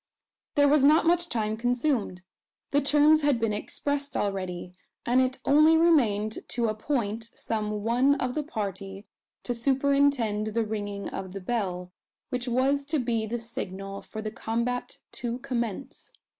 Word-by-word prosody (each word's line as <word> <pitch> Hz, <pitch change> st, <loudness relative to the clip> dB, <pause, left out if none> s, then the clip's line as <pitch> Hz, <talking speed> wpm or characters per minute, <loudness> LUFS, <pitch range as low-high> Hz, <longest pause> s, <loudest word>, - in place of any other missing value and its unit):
There 285 Hz, -1 st, +5 dB
was 285 Hz, -1 st, +4 dB
not 305 Hz, +3 st, +5 dB
much 345 Hz, +1 st, +2 dB
time 215 Hz, -2 st, -1 dB
consumed. 245 Hz, -5 st, -1 dB, 0.5 s
The 285 Hz, -, +3 dB
terms 300 Hz, +2 st, +5 dB
had 285 Hz, -4 st, +3 dB
been 225 Hz, -2 st, 0 dB
expressed 285 Hz, +6 st, -3 dB
already; 185 Hz, -3 st, -3 dB, 0.3 s
and 250 Hz, +2 st, +4 dB
it 255 Hz, 0 st, 0 dB
only 305 Hz, +3 st, +6 dB
remained 225 Hz, -11 st, +3 dB
to 235 Hz, -2 st, 0 dB
appoint 225 Hz, -1 st, -2 dB
some 210 Hz, -2 st, -3 dB
one 250 Hz, +5 st, +3 dB
of 255 Hz, -3 st, -2 dB
the 305 Hz, -, -1 dB
party 200 Hz, -, -5 dB, 0.4 s
to 245 Hz, -, -2 dB
superintend 255 Hz, -4 st, +1 dB
the 230 Hz, -1 st, +1 dB
ringing 205 Hz, -2 st, -4 dB
of 190 Hz, -1 st, -6 dB
the 195 Hz, -, -5 dB
bell, 180 Hz, -4 st, -3 dB, 0.4 s
which 250 Hz, 0 st, -3 dB
was 265 Hz, +4 st, +2 dB
to 305 Hz, +2 st, -1 dB
be 230 Hz, -4 st, -1 dB
the 235 Hz, +3 st, -2 dB
signal 195 Hz, -4 st, -6 dB
for 220 Hz, -1 st, -8 dB
the 215 Hz, -, -3 dB
combat 235 Hz, +2 st, -3 dB
to 240 Hz, 0 st, -4 dB
commence. 255 Hz, -, -4 dB
235 Hz, 150 wpm, -27 LUFS, 210-280 Hz, 0.5 s, only